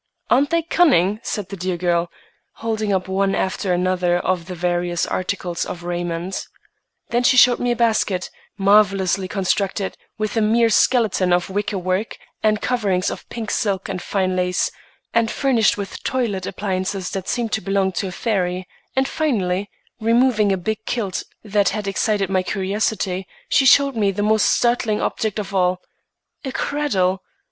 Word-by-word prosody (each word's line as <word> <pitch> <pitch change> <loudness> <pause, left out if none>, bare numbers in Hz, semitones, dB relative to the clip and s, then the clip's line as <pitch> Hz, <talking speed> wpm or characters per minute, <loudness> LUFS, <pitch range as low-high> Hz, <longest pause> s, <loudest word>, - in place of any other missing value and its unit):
"Aren't 275 +3 +4
they 335 0 +1
cunning?" 240 - +3
said 205 -3 -4
the 200 - -5
dear 185 -1 -2
girl, 170 -1 +1 0.4
holding 220 -2 -2
up 190 -1 0
one 195 +1 +1
after 190 0 -1
another 180 0 +1
of 175 -1 -1
the 180 - -6
various 175 0 0
articles 185 -2 -2
of 175 - -6
raiment. 175 +1 -3 0.6
Then 240 +1 +1
she 250 +1 +4
showed 245 -1 +6
me 245 - 0
a 240 - +2
basket, 220 -5 +1 0.3
marvellously 195 -2 +3
constructed, 195 0 -1 0.2
with 215 +1 -2
a 225 - +2
mere 225 +2 +3
skeleton 215 -6 +3
of 175 +2 +1
wicker 205 +1 -1
work 185 +4 -2 0.2
and 215 -1 +2
coverings 200 -7 0
of - - -9
pink 225 -3 -5
silk 195 -3 -1
and 185 -2 -3
fine 185 -2 -1
lace, 180 0 0 0.4
and 230 -1 +2
furnished 240 -7 +2
with 200 -1 -6
toilet 225 -8 -1
appliances 190 -1 -3
that 190 -2 -4
seemed 235 -3 -1
to 220 - 0
belong 195 -1 +1
to 190 +2 -2
a - - -5
fairy; 185 -3 -1 0.3
and 265 0 +2
finally, 200 - -1 0.3
removing 230 -2 +3
a 190 - +1
big 220 +4 -3
quilt 205 -6 -2 0.2
that 205 -2 +2
had 210 0 -4
excited 200 0 0
my 185 0 +1
curiosity, 195 0 -1 0.2
she 265 - +4
showed 280 0 +5
me 210 -3 +2
the 200 +1 -1
most 215 0 +3
startling 235 -3 +2
object 220 -2 -2
of 200 -1 -4
all,—a 185 +8 -4
cradle! 195 -11 0
195 Hz, 160 wpm, -21 LUFS, 185-220 Hz, 0.6 s, showed